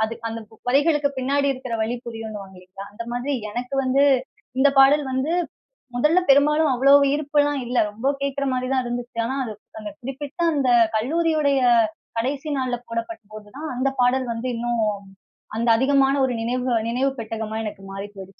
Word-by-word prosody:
அது 225 +1 -3
அந்த 225 0 -5 0.3
வரிகளுக்கு 290 +1 +3
பின்னாடி 280 +2 +1
இருக்குற 255 -3 -6
வலி 225 +2 -1
புரியுன்னுவாங்க 215 -4 -8
இல்லீங்களா? 185 +2 -11
அந்த 220 - -6
மாதிரி 255 +4 -2 0.2
எனக்கு 250 +4 -4
வந்து, 270 +2 +3 0.6
இந்த 285 - +6
பாடல் 285 +2 +5
வந்து 265 +5 -1 0.6
முதல்ல 300 +8 +4
பெரும்பாலும் 300 +2 +4
அவ்வளவு 275 +2 +5
ஈர்ப்புல்லாம் 290 -1 +1
இல்ல. 245 - -3 0.2
ரொம்ப 225 +6 -5 0.2
கேக்குற 280 0 -1
மாரி 255 0 -2
தான் 260 - +2
இருந்துச்சு. 240 0 -5
ஆனா, 265 +3 -3
அது 215 - -5 0.3
அந்த 210 -1 -7
குறிப்பிட்ட 275 +6 -7 0.2
அந்த 270 -2 +1 0.3
கல்லூரியுடைய 300 +1 +1 0.6
கடைசி 275 +5 -2
நாள்ல 250 -2 -1
போடப்பட்ட 230 +6 -4
போது 210 -1 -10
தான், 310 0 -5
அந்த 260 +2 +1
பாடல் 255 +1 +2
வந்து 240 +3 -4
இன்னும் 235 -1 0 0.7
அந்த 235 +1 0
அதிகமான 270 +2 +3
ஒரு 260 - 0
நினைவுக 250 +2 -1 0.2
நினைவு 255 +4 +1
பெட்டகமா 220 -1 -4
எனக்கு 205 -2 -7
மாறி 195 +1 -5
போய்டுச்சு. 195 0 -12
255 Hz, 160 wpm, -23 LUFS, 230-280 Hz, 0.7 s, இந்த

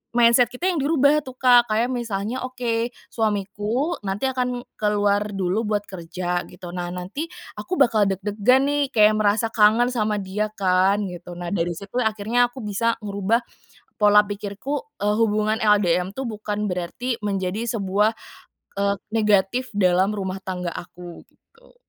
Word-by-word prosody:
mindset 240 +1 +5
kita 250 +10 -2
yang 340 - -1
dirubah 285 0 +3
tuh, 260 -1 -9
Kak, 245 -2 +5
kayak 225 +4 +1
misalnya, 230 0 -3
"Oke, 240 -2 -2 0.2
suamiku 215 - -1
nanti 195 +4 -3
akan 250 -1 -2 0.2
keluar 205 -1 +2 0.2
dulu 195 +4 -1
buat 210 -1 0
kerja," 180 -1 -4
gitu. 180 -1 -10
Nah, 175 0 -4
nanti 190 - -5 0.3
aku 370 - -3
bakal 225 - +3
deg-degan 205 +7 +2
nih, 290 0 +1
kayak, 215 -1 +5
merasa 215 +2 +1
kangen 225 +3 +4
sama 215 -3 0
dia 200 +3 -2
kan, 190 +1 +2
gitu. 175 0 -9
Nah, 175 0 -5
dari 175 -2 0
situ 200 +8 -5
akhirnya 220 +2 +1
aku 250 -1 -10
bisa 230 +3 0
ngerubah, 200 +3 0 0.6
pola 210 0 +6
pikirku, 205 - -4 0.2
eee, 210 +1 +2
hubungan 215 0 +1
LDM 190 -3 +2
tuh, 270 - -3
bukan 210 -2 -3
berarti 225 +8 -3
menjadi 200 +2 -2
sebuah, 210 0 +1 0.7
eee, 200 0 +1 0.2
negatif 215 +3 +2
dalam 190 +1 +2
rumah 190 -2 -3
tangga 180 -2 -3
aku, 175 0 -10
gitu. 470 +2 -26
210 Hz, 150 wpm, -23 LUFS, 195-240 Hz, 0.7 s, pola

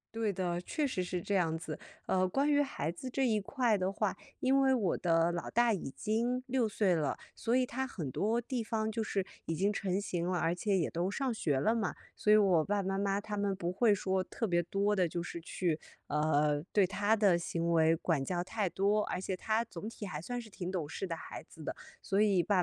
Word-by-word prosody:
对 225 -2 +1
的， 175 -2 -2
确 295 - -1
实 185 -8 -1
是 180 0 -3
这 200 - -1
样 165 -4 +2
子。 160 -2 -6 0.3
呃， 185 0 +2
关 275 +11 +1
于 290 0 +4
孩 265 - -2
子 180 +10 -5
这 265 0 +1
一 215 -2 +2
块 235 -1 +1
的 185 0 0
话， 205 0 -1 0.2
因 270 +1 +3
为 265 -1 +4
我 210 -9 +1
的 165 -1 +3
老 170 - -3
大 235 +1 +4
已 175 -8 -4
经 235 - 0
6 255 -3 +1
岁 195 -3 +2
了， 150 -3 0 0.2
所 230 +1 -1
以 255 0 +4
他 265 +2 -2
很 165 - -5
多 220 - +1
地 240 0 -3
方 220 0 -1
就 220 0 -2
是 195 -3 -1 0.2
已 165 - -1
经 200 +5 +1
成 195 -1 -1
型 175 -4 -2
了， 180 0 0
而 165 +2 +1
且 200 0 +1
也 165 - +1
都 175 +3 -1
上 265 +3 -1
学 150 -11 0
了 220 +10 +2
嘛。 215 -5 0 0.2
所 210 - +2
以 215 - +8
我 185 -6 +4
爸 205 +3 0
爸 190 - -4
妈 195 - 0
妈 200 0 +1
他 210 0 -5
们 200 -1 0
不 175 -1 -3
会 215 +2 +4
说 190 -1 0
特 225 - -3
别 175 -2 +2
多 200 +4 +1
地 185 -3 +3
就 170 - -3
是 170 -1 -6
去， 165 -1 -1 0.3
呃， 150 -1 +2
对 200 -3 +4
他 205 +2 +1
的 200 -5 +4
行 170 0 -1
为 160 0 +5
管 160 -4 0
教 175 +4 -1
太 200 +1 -1
多。 205 +4 +2
而 - - -2
且 190 0 -2
他 220 +4 0
总 205 +4 -7
体 220 -2 -7
还 155 -5 -5
算 245 +7 -4
是 225 - -12
挺 185 -2 -5
懂 170 -6 -2
事 195 - -4
的 170 - -3
孩 - - -8
子 160 - -13
的， - - -4 0.3
所 200 +1 +1
以， 200 -4 +4
爸 200 +3 +1
195 Hz, 255 characters per minute, -32 LUFS, 175-220 Hz, 0.3 s, 以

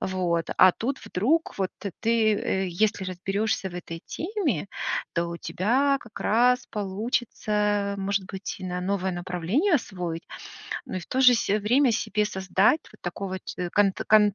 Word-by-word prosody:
вот. 175 -3 -1
А 185 - +8
тут 260 +8 -3
вдруг, 265 - +2 0.2
вот 190 -1 0
ты, 200 - -4
ты, 225 -2 +3
э, 190 -2 -1 0.2
если 205 -2 -1
разберёшься 195 +2 -1
в 175 - -11
этой 165 -2 -6
теме, 335 - -2 0.5
то 170 0 0
у 170 - -4
тебя 270 +12 +1
как 230 - -11
раз 245 +3 +3
получится, 210 -1 -1
может 195 0 -1
быть, 190 - -5
и - - -6
на 180 0 -3
новое 190 0 -1
направление 180 - 0
освоить. 180 - -2 0.6
Ну, - - -6
и - - -2
в 175 - -11
то 260 - -1
же 250 -2 +8
се 210 -2 +1
время 245 +5 +3
себе 210 -1 0
создать 190 - +2
вот - - -18
такого 190 +2 -4
че 180 -1 -4
конт 200 -2 +3
конт 210 -2 +6
200 Hz, 165 wpm, -26 LUFS, 185-230 Hz, 0.6 s, А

